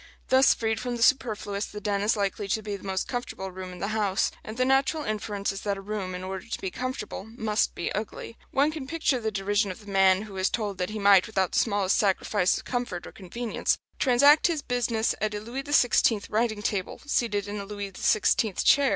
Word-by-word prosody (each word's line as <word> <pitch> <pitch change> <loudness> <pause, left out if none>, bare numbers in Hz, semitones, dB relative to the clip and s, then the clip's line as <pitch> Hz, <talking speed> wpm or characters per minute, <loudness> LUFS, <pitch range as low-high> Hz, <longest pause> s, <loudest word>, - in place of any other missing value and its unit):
Thus 260 +1 +6
freed 225 -1 -1
from 245 -1 -3
the 235 - 0
superfluous, 215 -7 +1
the 210 - -8
den 200 -1 -1
is 215 +2 +2
likely 200 0 -1
to 215 +2 -1
be 205 -1 -3
the 195 - -11
most 190 -1 -2
comfortable 245 -6 -4
room 185 0 -7
in 180 - -9
the 200 +3 -3
house; 210 -2 +1
and 220 +1 -8
the 255 - +2
natural 270 +4 +2
inference 210 -3 -2
is 195 - -6
that 200 -1 -1
a - - -7
room, 195 -2 -4
in 180 - -6
order 190 +1 -6
to - - -4
be 190 - -4
comfortable, 255 -4 -5
must 215 -2 0
be 170 - -3
ugly. 215 +2 -5
One 285 +3 +2
can 305 -4 -6
picture 305 -4 0
the 220 -2 -1
derision 205 0 0
of 185 - -7
the 205 -1 -10
man 190 0 +4
who 200 -3 -9
is 190 0 +2
told 205 -4 -3
that 180 - -1
he 215 - -5
might, 200 -2 +5
without 190 -4 0
the - - +2
smallest 200 -4 +1
sacrifice 195 -1 +2
of - - -8
comfort 245 -9 -3
or - - -9
convenience, 220 +5 -2 0.2
transact 285 +5 +5
his 320 -4 -2
business 235 -3 0
at 215 0 -1
a - - -2
Louis 235 +5 -5
XVI 245 -6 +3
writing 220 -1 0
table, 195 -3 -2
seated 210 -8 0
in 205 0 -4
a 200 - -5
Louis 205 -1 -6
XVI 210 +1 +1
chair! 280 -1 +5
210 Hz, 225 wpm, -27 LUFS, 195-240 Hz, 0.2 s, Thus